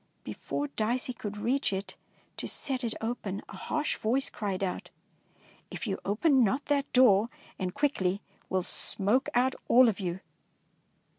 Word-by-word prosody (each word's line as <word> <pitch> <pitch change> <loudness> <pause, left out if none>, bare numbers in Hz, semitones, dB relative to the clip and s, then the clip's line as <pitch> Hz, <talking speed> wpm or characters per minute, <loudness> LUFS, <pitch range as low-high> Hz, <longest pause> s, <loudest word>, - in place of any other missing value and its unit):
Before 290 - -4
Dicey 245 +1 -1
could 210 -3 -6
reach 245 +6 +1
it 195 +1 -4 0.4
to - - -4
set 265 -2 0
it 230 -2 -2
open, 225 -4 -3
a - - -10
harsh 305 -1 -2
voice 260 +5 0
cried 195 -3 -3
out, 185 - -3 0.4
— - - -36 0.3
"If - - -6
you 195 -3 -2
open 255 +6 +3
not 260 +7 +1
that 285 -1 0
door 230 -4 +5 0.3
and 185 -2 -1
quickly, 200 -7 0 0.3
we - - -2
11 185 - +2
smoke 210 +9 +1
out 255 +2 +3
all 250 +1 +7
of 215 -3 0
you! 180 -1 -3
225 Hz, 160 wpm, -29 LUFS, 195-260 Hz, 0.4 s, all